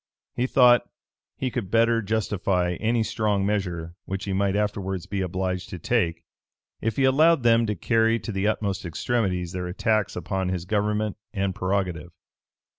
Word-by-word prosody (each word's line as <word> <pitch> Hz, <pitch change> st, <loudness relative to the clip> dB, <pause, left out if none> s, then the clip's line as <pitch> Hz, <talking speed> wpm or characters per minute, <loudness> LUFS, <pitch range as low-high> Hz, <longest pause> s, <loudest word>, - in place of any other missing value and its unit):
He 125 Hz, +1 st, 0 dB
thought 125 Hz, -2 st, +5 dB
that -, -, -37 dB, 0.5 s
he 130 Hz, -1 st, -2 dB
could 115 Hz, -7 st, -3 dB
better 115 Hz, +1 st, +3 dB
justify 100 Hz, -4 st, 0 dB
any 115 Hz, +1 st, +1 dB
strong 105 Hz, -3 st, 0 dB
measure 90 Hz, -5 st, -2 dB
which 95 Hz, +1 st, -4 dB
he 100 Hz, -, -2 dB
might 100 Hz, 0 st, +1 dB
afterwards 100 Hz, -3 st, -2 dB
be 100 Hz, +1 st, -3 dB
obliged 90 Hz, 0 st, -2 dB
to 90 Hz, -, -6 dB
take, 85 Hz, -4 st, 0 dB, 0.6 s
if 115 Hz, -1 st, -1 dB
he 135 Hz, -, +1 dB
allowed 150 Hz, +2 st, +4 dB
them 115 Hz, -1 st, +4 dB
to 105 Hz, -, -1 dB
carry 115 Hz, +5 st, +2 dB
to -, -, -5 dB
the 95 Hz, 0 st, 0 dB
utmost 100 Hz, -3 st, -1 dB
extremities 90 Hz, -1 st, -1 dB
their 90 Hz, -1 st, -4 dB
attacks 105 Hz, +3 st, 0 dB
upon 90 Hz, +2 st, -2 dB
his 90 Hz, -2 st, -3 dB
government 105 Hz, +1 st, 0 dB, 0.2 s
and 95 Hz, -1 st, 0 dB
prerogative. 90 Hz, -4 st, -2 dB
100 Hz, 165 wpm, -25 LUFS, 90-115 Hz, 0.6 s, thought